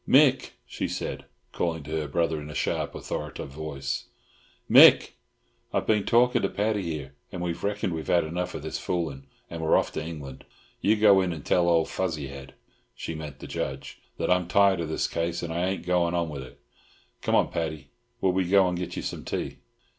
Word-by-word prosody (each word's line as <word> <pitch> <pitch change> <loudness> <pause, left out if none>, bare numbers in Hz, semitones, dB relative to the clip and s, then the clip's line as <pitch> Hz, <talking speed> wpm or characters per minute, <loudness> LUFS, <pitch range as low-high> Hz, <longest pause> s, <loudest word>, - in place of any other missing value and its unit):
"Mick!" 135 -2 +5
she - - -3
said, - - -4 0.3
calling 80 -3 -2
to 75 - -9
her 80 -1 -1
brother 80 +1 0
in 75 - -8
a 75 - -8
sharp, - - -1
authoritative 70 - -5
voice: 70 -2 -4 0.6
"Mick! - - +8 0.6
I've - - 0
been 105 -2 +2
talking 125 +1 +4
to 95 - +1
Paddy 105 0 0
here, 75 -6 -5 0.2
and 90 - -5
we've 85 -1 -3
reckoned 100 -3 -1
we've 80 -2 -5
had 85 - +3
enough 90 +3 -3
of - - -6
this - - -4
fooling, 75 -6 -3 0.2
and 85 -1 -6
we're 80 - +4
off - - 0
to - - -4
England. 75 -5 -8 0.4
You 105 +2 +4
go 105 -3 +6
in 90 -1 0
and 80 -4 -7
tell 85 -1 +3
old 85 -1 +3
Fuzzy 80 -7 -2
Head" 70 -1 -10 0.4
(she - - -5
meant 75 -3 -7
the - - -10
Judge) 65 0 -5 0.2
"that - - 0
I'm 90 -1 +2
tired 100 0 +4
of 80 - -3
this 80 - 0
case, 85 +1 -2
and 85 -1 -3
I 85 +2 0
ain't 95 -1 -3
goin' 90 -1 +2
on 85 -2 0
wid 70 -3 -6
it. 65 - -12 0.6
Come - - +1
on, - - +3
Paddy, 80 -4 -3 0.3
will 95 - +3
we 95 0 +1
go 95 -1 +5
and 90 - -1
get 90 -1 -4
some - - -5
tea?" - - -4
85 Hz, 205 wpm, -27 LUFS, 75-95 Hz, 0.6 s, Mick